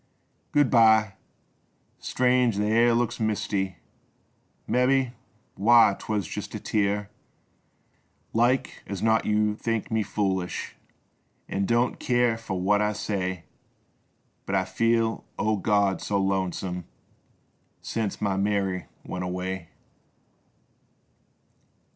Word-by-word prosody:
Good 145 -3 +3
by! 110 -3 +5 0.9
Strange 125 -3 +2
th' - - +1
air 115 +3 +3
looks 120 -1 0
misty! 100 -3 -1 0.5
— - - -42
Mebby 130 0 +2 0.2
— - - -39
why 115 0 +5
— - - -23
'twas 105 -3 -2
just - - -6
a - - -4
tear! 105 0 -1 1.2
Like 120 +3 +1
as 100 -2 -5
not 110 0 +3
j^ou 105 0 +1
think 115 0 -3
me 110 0 +2
foolish 95 -3 -2 0.7
An' 95 0 -1
don't 120 +1 +1
keer 120 -2 +2
for 110 -5 -5
what 105 +3 +2
I 105 0 +1
say, 95 -4 -3 1.0
But 100 - -1
I 95 -1 +2
feel, 115 +3 +1
oh 110 0 +1
God, 100 -1 +1
so 100 - -1
lonesome 95 -2 -1 1.0
Sence 110 -3 -3
my 100 -2 0
Mary 100 -2 0 0.2
went 90 - -4
away 90 -1 -4
105 Hz, 115 wpm, -26 LUFS, 95-115 Hz, 1.2 s, by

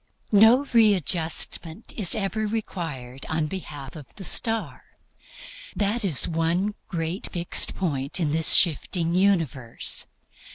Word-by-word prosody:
No 225 +6 +6
readjustment 180 -3 +1
is 200 -7 +4
ever 215 +1 -2
required 160 - -5
on 160 -1 0
behalf 150 -5 -7
of 150 -4 -10
the 195 - -10
Star. 225 +4 -2 0.8
That 210 +3 0
is 170 -9 +1
one 170 +5 0
great 165 +1 -4
fixed 175 -2 -1
point 140 -5 -1
in 155 -4 0
this 160 +1 +5
shifting 170 0 +2
universe. 165 -11 0
175 Hz, 115 wpm, -24 LUFS, 160-205 Hz, 0.8 s, No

